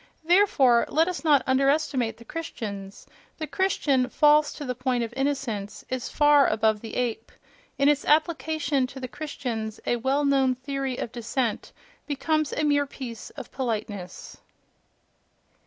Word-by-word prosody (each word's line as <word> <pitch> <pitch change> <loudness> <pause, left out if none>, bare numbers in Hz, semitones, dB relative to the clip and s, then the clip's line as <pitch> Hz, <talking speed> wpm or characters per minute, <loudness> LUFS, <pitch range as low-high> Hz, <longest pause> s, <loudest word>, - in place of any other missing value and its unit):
Therefore, 315 -9 +4
let 320 +3 +3
us 360 -2 -4
not 295 -4 +4
underestimate 275 -2 +1
the 235 - -15
Christians: 200 -11 -6 0.3
the 315 - -3
Christian, 290 -8 +1
false 300 0 +4
to 290 - -7
the 250 - -2
point 250 -1 -1
of 230 0 -5
innocence, 265 -7 -3
is 255 -1 -3
far 295 -2 +5
above 220 -1 +1
the 225 - -7
ape—in 250 +3 -3
its 290 -1 +3
application 305 -3 +1
to 260 +1 -10
the 255 - -5
Christians 245 -7 -5
a 240 - +1
well 270 +4 +1
known 270 -2 +3
theory 270 0 -4
of 225 - -4
descent 235 0 -2 0.4
becomes 305 +1 0
a 305 - -1
mere 285 -1 +2
piece 245 -5 -8
of - - -8
politeness.... 210 -7 -5
265 Hz, 140 wpm, -26 LUFS, 235-295 Hz, 0.4 s, far